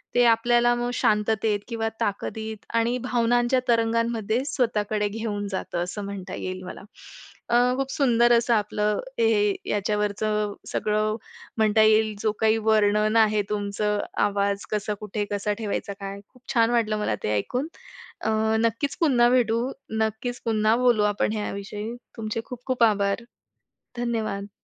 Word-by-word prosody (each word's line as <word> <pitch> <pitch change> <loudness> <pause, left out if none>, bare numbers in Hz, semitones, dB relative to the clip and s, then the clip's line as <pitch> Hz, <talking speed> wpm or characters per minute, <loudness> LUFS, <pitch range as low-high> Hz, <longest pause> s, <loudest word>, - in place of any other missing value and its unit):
ते 245 - +5
आपल्याला 240 +1 +4
मग 240 0 -2
शांततेत 210 -1 +1
किंवा 225 -2 -2
ताकदीत 220 +1 -3
आणि 230 +2 +2
भावनांच्या 240 +1 +2
तरंगांमध्ये 230 0 +1
स्वतःकडे 215 -6 0
घेऊन 205 -1 -3
जातं 175 -2 -2
असं 190 +3 -5
म्हणता 195 -2 -6
येईल 185 0 -5
मला. - - -8 0.7
अ, - - +2 0.2
खूप 270 0 -2
सुंदर 240 -3 +3
असं 235 0 +2
आपलं 210 -1 0 0.2
हे 210 -3 +3 0.2
याच्यावरचं 210 0 0 0.2
सगळं 215 0 0 0.4
म्हणता 220 0 +4
येईल, 215 0 +4
जो 215 - +2
काही 220 0 +4
वर्णन 215 0 +3
आहे, 215 -1 +4
तुमचं 210 0 -1 0.3
आवाज 200 0 -1
कसा, 210 0 -1
कुठे, 210 0 -3
कसा 205 +1 -1
ठेवायचा 205 -1 -3
काय? 195 0 -5 0.3
छान 230 -2 +4
वाटलं, 220 -3 +1
मला 210 - 0
ते 105 - 0
ऐकून. 250 - -2 0.5
अ, - - -1 0.3
नक्कीच 230 +5 0
पुन्हा 245 -7 +4
भेटू. 235 -2 +2 0.4
नक्कीच 220 +3 -2
पुन्हा 220 -1 +2
बोलू 240 -4 +3
आपण 205 - 0
याविषयी. 210 +1 -4 0.2
तुमचे 220 0 -3
खूप-खूप 250 0 -2
आभार. 205 0 +2 0.7
धन्यवाद. 220 -4 -2
220 Hz, 135 wpm, -25 LUFS, 210-235 Hz, 0.7 s, ते